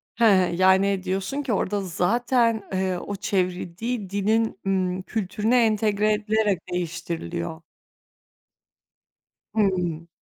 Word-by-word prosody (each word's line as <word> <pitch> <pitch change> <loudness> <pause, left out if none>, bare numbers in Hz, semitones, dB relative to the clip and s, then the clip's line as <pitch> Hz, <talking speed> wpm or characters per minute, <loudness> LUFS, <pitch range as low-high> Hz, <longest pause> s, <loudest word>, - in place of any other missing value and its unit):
He, 235 - 0 0.3
yani, 190 +1 +3
diyorsun 195 +9 -2
ki, 265 -5 -2
orada 200 +1 0
zaten, 230 +5 +1
eee, 185 -1 0
o 200 +3 -5
çevrildiği 190 +3 -2
dilin, 215 +2 0
ımm, 185 -1 0
kültürüne 220 +4 +1
entegre 215 -1 +2
edilerek 210 -2 +1
değiştiriliyor. 165 - -4 1.9
Hımm. 180 -5 0
195 Hz, 95 wpm, -24 LUFS, 185-220 Hz, 1.9 s, yani